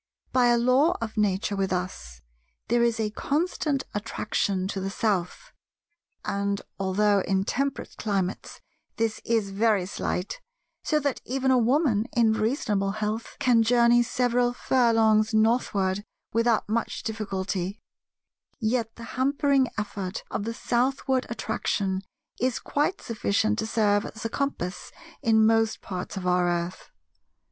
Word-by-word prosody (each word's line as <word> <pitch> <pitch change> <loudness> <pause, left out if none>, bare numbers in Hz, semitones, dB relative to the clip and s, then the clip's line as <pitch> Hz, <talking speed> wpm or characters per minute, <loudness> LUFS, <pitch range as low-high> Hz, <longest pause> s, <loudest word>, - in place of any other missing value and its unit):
By 250 -1 +4
a 240 0 +4
Law 255 +8 +3
of 225 -1 -5
Nature 205 -1 +1
with 195 -1 -1
us, 65 - -4 0.5
there 240 +1 +3
is 235 -1 +2
a 215 -1 0
constant 290 +1 -1
attraction 200 -2 -1
to 195 - -3
the 195 - -2
South; 205 - -2 0.7
and, 200 0 -1 0.2
although 200 +1 +2
in 190 0 0
temperate 275 +4 -2
climates 195 -3 -2 0.3
this 225 -1 -1
is 220 -4 0
very 205 -2 +2
slight—so 325 - -4
that 280 -2 -1
even 265 +1 0
a 260 - +5
Woman 240 -3 +2
in 225 -2 +5
reasonable 215 -3 0
health 215 +2 -3
can 240 -2 +4
journey 240 +1 +5
several 245 0 +1
furlongs 225 -4 +3
northward 205 -4 +2 0.3
without 230 0 +2
much 225 +2 -2
difficulty—yet 215 +3 -4
the 235 - -10
hampering 275 +2 +2
effort 200 -2 -4
of 200 - -2
the 230 - -2
southward 260 +2 0
attraction 200 -4 -1 0.4
is 255 -1 +1
quite 300 +7 -1
sufficient 215 -1 0
to 220 - -1
serve 210 -2 +2
as 225 - -9
a - - 0
compass 225 -10 -3 0.3
in 220 -4 +4
most 225 0 +3
parts 185 0 -6
of 185 - -4
our 180 0 +3
earth. 175 +1 -3
220 Hz, 130 wpm, -26 LUFS, 200-245 Hz, 0.7 s, a